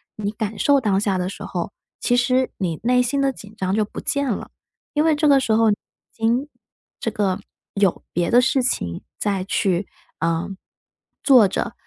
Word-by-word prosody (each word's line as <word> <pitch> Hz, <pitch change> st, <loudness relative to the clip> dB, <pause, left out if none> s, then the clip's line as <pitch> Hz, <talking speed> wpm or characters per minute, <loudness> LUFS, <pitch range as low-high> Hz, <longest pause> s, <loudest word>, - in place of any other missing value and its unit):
你 205 Hz, -1 st, -3 dB
感 215 Hz, -1 st, -4 dB
受 285 Hz, +5 st, +4 dB
当 205 Hz, -6 st, +1 dB
下 200 Hz, -2 st, +1 dB
的 180 Hz, 0 st, -1 dB
时 200 Hz, -, -8 dB
候， -, -, -4 dB, 0.3 s
其 245 Hz, -, +2 dB
实 255 Hz, +1 st, +2 dB
你 170 Hz, -5 st, -2 dB
内 250 Hz, +1 st, +4 dB
心 255 Hz, +3 st, 0 dB
的 275 Hz, 0 st, +2 dB
紧 210 Hz, -3 st, -13 dB
张 190 Hz, -1 st, 0 dB
就 215 Hz, -, +2 dB
不 -, -, -8 dB
见 280 Hz, -1 st, 0 dB
了。 205 Hz, -, -5 dB, 0.4 s
因 300 Hz, -, +2 dB
为 320 Hz, 0 st, +4 dB
这 300 Hz, +1 st, +2 dB
个 280 Hz, -2 st, +6 dB
时 230 Hz, -, -1 dB
候， 225 Hz, 0 st, +4 dB
已 -, -, +4 dB, 0.4 s
经， 235 Hz, +5 st, 0 dB, 0.5 s
这 -, -, -1 dB
个， 200 Hz, -2 st, 0 dB, 0.4 s
有 200 Hz, -3 st, +1 dB
别 175 Hz, -1 st, 0 dB
的 240 Hz, -, +6 dB
事 265 Hz, +1 st, +2 dB
情 85 Hz, -, -2 dB, 0.2 s
再 200 Hz, -3 st, -1 dB
去， 190 Hz, -1 st, 0 dB, 0.3 s
呃， 165 Hz, 0 st, 0 dB, 0.8 s
做 250 Hz, -7 st, +7 dB
着， 185 Hz, -, -3 dB
220 Hz, 200 characters per minute, -22 LUFS, 195-255 Hz, 0.8 s, 做